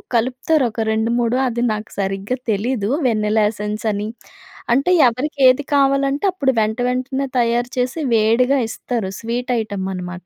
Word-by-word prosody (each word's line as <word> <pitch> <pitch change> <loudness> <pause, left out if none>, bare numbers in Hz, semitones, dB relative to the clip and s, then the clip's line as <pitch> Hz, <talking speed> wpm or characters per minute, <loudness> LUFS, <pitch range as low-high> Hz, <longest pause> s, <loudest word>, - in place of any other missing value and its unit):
కలుపుతారు 255 +6 +1
ఒక 225 +1 -4
రెండు 220 +1 0
మూడు 240 0 +1
అది 240 -1 -2
నాకు 215 0 -6
సరిగ్గా 195 +4 -2 0.2
తెలీదు 215 0 -1 0.2
వెనీలా 215 -1 +1
ఎసెన్స్ 210 0 -5
అని. 205 +1 -3 0.7
అంటే 275 +8 +2 0.2
ఎవరికి 260 +5 -3
ఏది 255 +3 +4
కావాలంటే 275 +3 +2
అప్పుడు 280 -8 +1
వెంటవెంటనే 250 +5 -1
తయారు 240 +1 +1
చేసి 250 +5 -1
వేడిగా 230 +5 +3
ఇస్తారు 225 -3 -3
స్వీట్ 240 +2 -4
ఐటమ్ 200 -3 -4
అనమాట. 180 0 -7
235 Hz, 140 wpm, -19 LUFS, 215-255 Hz, 0.7 s, ఏది